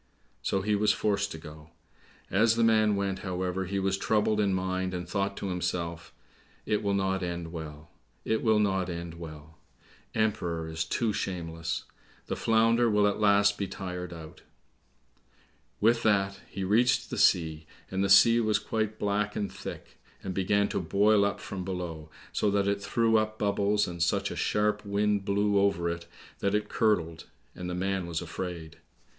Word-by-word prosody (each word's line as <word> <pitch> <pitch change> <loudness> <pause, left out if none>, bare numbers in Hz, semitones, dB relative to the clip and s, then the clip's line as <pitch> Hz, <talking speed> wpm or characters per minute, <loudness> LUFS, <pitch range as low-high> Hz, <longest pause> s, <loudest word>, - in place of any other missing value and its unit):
So 95 -1 -1
he 105 +1 +1
was 105 0 +3
forced 100 -2 0
to - - -6
go. 75 0 -12 0.6
As 110 +4 +4
the 115 - +2
man 110 -2 +4
went, 100 -1 -1
however, 95 0 -2
he 100 +2 -3
was 95 0 0
troubled 105 0 +1
in 100 -2 +2
mind, 95 0 -1
and 90 -1 -5
thought 100 +2 -2
to 100 - -3
himself, 85 -2 -3 0.5
"It 105 0 0
will 100 -1 0
not 95 -1 0
end 85 -2 -4
well; 75 -2 -8 0.3
it 110 - 0
will 110 -2 +3
not 95 -3 +1
end 85 -1 -6
well! 80 -1 -10 0.6
Emperor 90 -7 0
is 80 0 -3
too 110 +6 0
shameless! 85 -3 -3 0.4
The - - -3
Flounder 115 +1 +3
will 105 -1 +3
at 105 +1 +1
last 100 -1 +4
be 100 - -1
tired 90 -2 -6
out." 80 -2 -10 1.4
With 115 +2 +3
that 100 -3 +1
he 95 - -5
reached 115 +6 +2
the - - -3
sea, 80 -3 +2 0.2
and 95 +1 0
the 100 - 0
sea 115 +4 +7
was 110 -2 +2
quite 110 -1 -2
black 105 0 -1
and 100 - -2
thick, - - -9 0.2
and 95 - -4
began 100 +2 +2
to - - -1
boil 100 +5 +3
up 100 0 0
from 95 -2 -6
below, 85 -4 -5 0.2
so 105 - +1
that 100 0 +1
it 100 0 0
threw 115 +3 +2
up 110 0 -1
bubbles, 105 0 +1
and 85 -1 -6
such 85 - +1
a - - -5
sharp 105 0 0
wind 100 0 0
blew 100 0 +2
over 100 -4 +1
it 85 0 -7 0.3
that 100 +1 +1
it 105 0 -1
curdled, 85 -8 0 0.3
and 90 0 -6
the 90 - -3
man 95 -1 -1
was 85 -1 -2
afraid. 85 -1 -6
100 Hz, 175 wpm, -28 LUFS, 85-105 Hz, 1.4 s, sea